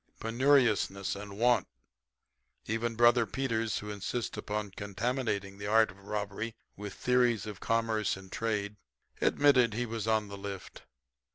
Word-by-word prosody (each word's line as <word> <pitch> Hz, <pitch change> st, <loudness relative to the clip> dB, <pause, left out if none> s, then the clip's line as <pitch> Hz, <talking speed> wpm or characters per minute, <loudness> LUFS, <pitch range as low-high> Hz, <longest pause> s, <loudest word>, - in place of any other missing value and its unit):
Penuriousness 115 Hz, -6 st, +2 dB
and 100 Hz, 0 st, -8 dB
want. 120 Hz, -3 st, +3 dB, 1.0 s
Even 115 Hz, +1 st, -1 dB
Brother 120 Hz, 0 st, +5 dB
Peters, 115 Hz, -3 st, -1 dB
who 105 Hz, 0 st, -5 dB
insists 105 Hz, +3 st, -3 dB
upon 105 Hz, -1 st, -3 dB
contaminating 100 Hz, -1 st, -2 dB
the 100 Hz, -, -4 dB
art 110 Hz, 0 st, +4 dB
of 95 Hz, -, -17 dB
robbery 105 Hz, +2 st, -3 dB, 0.2 s
with 105 Hz, -1 st, -7 dB
theories 125 Hz, -4 st, +2 dB
of 105 Hz, -3 st, -7 dB
commerce 115 Hz, -3 st, 0 dB
and 95 Hz, -1 st, -13 dB
trade, 105 Hz, -2 st, -2 dB, 0.4 s
admitted 130 Hz, -6 st, +4 dB
he 120 Hz, +1 st, 0 dB
was 115 Hz, -2 st, -4 dB
on 110 Hz, -1 st, +2 dB
the 100 Hz, 0 st, -8 dB
lift. 100 Hz, -2 st, -7 dB
110 Hz, 140 wpm, -31 LUFS, 100-120 Hz, 1.0 s, Brother